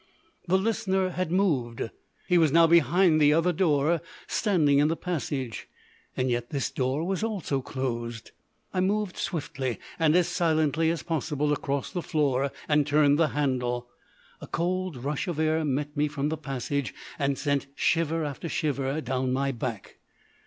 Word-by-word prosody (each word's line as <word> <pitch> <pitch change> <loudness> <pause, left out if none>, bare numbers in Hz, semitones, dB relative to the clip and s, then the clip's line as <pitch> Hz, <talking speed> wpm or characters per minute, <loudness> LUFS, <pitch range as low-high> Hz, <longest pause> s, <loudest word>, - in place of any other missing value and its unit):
The 185 +2 +4
Listener 190 -2 0
had 180 -2 -2
moved; 130 - 0 0.4
he 180 -1 +4
was 160 -4 +4
now 165 +2 +6
behind 165 +1 +4
the 150 0 +6
other 165 +3 +2
door, 155 -1 +2 0.2
standing 155 -10 +2
in 145 - +4
the 165 - 0
passage. 140 - -3 0.5
Yet 120 -2 0
this 140 -2 -2
door 130 +4 -1
was 190 +3 -1
also 190 -11 -1
closed. 120 -3 -4 0.4
I 185 - 0
moved 200 +1 0
swiftly, 135 -7 -3 0.2
and 160 -1 +4
as 180 -1 +4
silently 160 -2 +1
as 165 0 -2
possible, 150 -2 -1
across 140 -2 -2
the 180 - -2
floor, 140 -4 0 0.2
and 150 -1 +3
turned 145 0 +4
the 165 - +4
handle. 125 -4 -1 0.5
A - - -8
cold 185 -2 -1
rush 140 +7 -3
of 175 -4 -3
air 160 0 +2
met 145 +1 -2
me 150 0 +2
from 145 0 -2
the 160 - -1
passage 135 - -3 0.2
and 140 -1 +1
sent 140 -2 0
shiver 165 0 +1
after 145 +3 -5
shiver 140 -2 -1
down 130 0 -1
my 135 +1 0
back. 115 -4 -5
150 Hz, 160 wpm, -27 LUFS, 135-170 Hz, 0.5 s, now